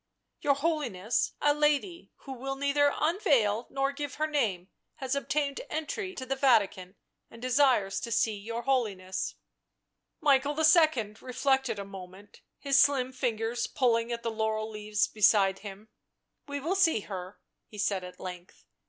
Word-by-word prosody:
" - - -54
Your 280 -1 +3
Holiness, 280 - -1
a 290 - +4
lady, 300 +4 0
who 270 - -9
will 270 +2 -4
neither 280 +1 +2
unveil 255 - +2
nor 275 0 0
give 290 0 -5
her 305 - 0
name, 215 - -1 0.3
has 265 -3 -3
obtained 280 0 -1
entry 365 +5 -4
to 260 - -6
the 270 +1 -1
Vatican 210 -8 +2 0.3
and 230 - -13
desires 255 -5 +2
to 235 - -6
see 225 -1 +1
your 230 +4 -5
Holiness." 200 -9 -1 0.8
Michael 285 -1 +2
II. 310 - +4
reflected 265 -2 0
a 200 - -5
moment, 195 +1 -12 0.2
his 275 -1 +3
slim 270 -3 +2
fingers 235 -2 -2
pull 250 -4 +2
ing 230 +1 -2
at 235 0 -4
the 230 - -1
laurel 220 0 -2
leaves 210 -1 -1
beside 200 -2 +3
him. 205 +1 -10 0.3
" - - -53
We 285 0 -4
will 325 +7 -1
see 325 - +3
her," 185 -1 -8 0.3
he 210 - -13
said 195 -2 0
at 180 0 -10
length. 180 -1 -9
250 Hz, 160 wpm, -29 LUFS, 210-285 Hz, 0.8 s, a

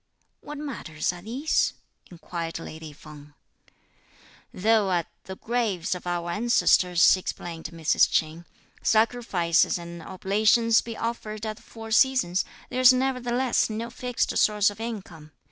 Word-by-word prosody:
"What 295 0 -9
matters 210 - -4
are 175 - -10
these?" 255 - 0 0.4
inquired 165 -1 -6
lady 160 -1 -9
Feng. 150 0 -14 1.2
"Though 215 0 +2
at 175 -2 +1 0.2
the 190 - -7
graves 220 -7 -1
of 180 -1 -7
our 175 -1 -2
ancestors," 180 -5 +4
explained 175 -3 -6
Mrs. 165 -2 +2
Ch'in, 160 +2 -1 0.4
"sacrifices 220 -8 +2
and 170 0 -9
oblations 215 +5 +2
be 230 -1 -8
offered 220 -2 -4
at 215 -1 -4
the - - -17
four 225 -1 -11
seasons, 235 -7 +3 0.3
there's 255 0 +6
nevertheless 255 -1 0
no 225 +2 -5
fixed 245 0 -2
source 210 -1 +3
of 205 - -13
income. 185 -10 -7
205 Hz, 130 wpm, -25 LUFS, 170-235 Hz, 1.2 s, there's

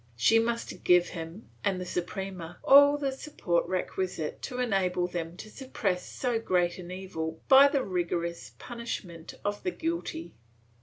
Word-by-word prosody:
She 175 - +5
must 235 +1 -2
give 180 0 +5
him 165 +5 -8 0.2
and 195 -2 +1
the 180 - -4
Suprema 180 -1 -5
all 285 +1 +8
the 280 -2 -1
support 265 - -1
requisite 185 -3 -3
to 250 - -5
enable 190 -7 +1
them 175 -1 -5
to 215 - -9
suppress 205 -9 -2
so 245 -3 -1
great 180 -5 +1
an 175 -1 -8
evil 165 -4 -5
by 275 +1 +9
the 280 -2 +1
rigorous 170 -2 -2
punishment 200 -9 -6
of 205 0 -1
the 365 - -1
guilty. 335 -1 -4
190 Hz, 150 wpm, -29 LUFS, 175-245 Hz, 0.2 s, by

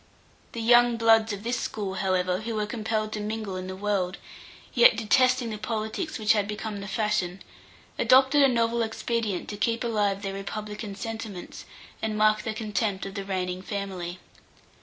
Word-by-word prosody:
The 230 - -4
young 240 +1 +5
bloods 225 -1 +4
of 205 0 -5
this 240 +1 -1
school, 200 -3 -3
however, 185 -1 0
who 225 +1 -4
were 210 -1 0
compelled 215 -1 -2
to 215 - -3
mingle 210 -2 -4
in 185 0 -5
the 185 - -5
world, 195 -2 -1 0.6
yet 235 -2 +7
detesting 255 +2 +3
the 215 - -5
politics 220 - -3
which 215 0 +4
had 205 -2 0
become 210 0 -4
the 200 - -6
fashion, 195 -3 -1 0.6
adopted 265 +3 +5
a 275 - +7
novel 235 -2 +1
expedient 220 -3 -2
to 205 - -5
keep 230 +3 0
alive 205 -4 0
their 195 -1 -3
republican 210 +1 -5
sentiments, 220 -3 -7 0.4
and 215 -1 -2
mark 215 0 +4
their 215 0 -4
contempt 215 -2 -2
of 195 - -6
the 200 -1 -4
reigning 185 -1 -3
family. 190 -3 -4
215 Hz, 170 wpm, -27 LUFS, 195-230 Hz, 0.6 s, yet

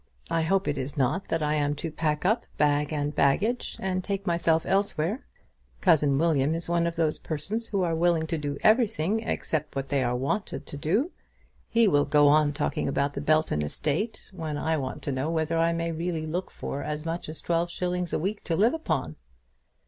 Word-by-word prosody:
I 165 - +2
hope 190 +3 +1
it 145 -2 0
is 135 +3 -5
not 145 +8 +1
that 165 -1 0
I 150 0 +1
am 145 -1 +1
to 165 +2 -4
pack 155 0 -1
up, 220 +5 +2
bag 145 0 +2
and 145 -1 -1
baggage, 200 - +1
and 185 -1 -1
take 200 0 -3
myself 170 -1 +2
elsewhere. 195 - 0 0.5
Cousin 150 -6 +4
William 155 -1 +2
is 165 - -4
one 170 0 +2
of 170 - -3
those 160 -2 0
persons 210 +9 -3
who 195 -3 0
are 170 -2 +1
willing 165 -1 +2
to 165 +1 -2
do 145 -1 -3
everything 215 -3 +3
except 155 -9 -3
what 135 0 -3
they 140 -2 +1
are 120 0 0
wanted 140 +11 -2
to - - -7
do. 190 - 0 0.6
He 230 -1 +4
will 145 -6 +4
go 145 -1 +5
on 150 0 +4
talking 145 +1 -1
about 140 +1 0
the 140 - -4
Belton 155 - +2
estate, 155 - -2
when 160 -5 -4
I 160 +2 0
want 135 -4 -4
to 140 - -2
know 135 +3 -1
whether 165 0 0
I 165 0 +3
may 165 0 -1
really 165 -1 -2
look 175 +4 -3
for 140 - -5
as 150 +1 -4
much 165 -1 -3
as 155 - -6
twelve 170 0 0
shillings 180 -1 -2
a - - +1
week 200 +6 -3
to 165 - 0
live 220 +8 +4
upon." 90 - -2
160 Hz, 205 wpm, -27 LUFS, 145-180 Hz, 0.6 s, go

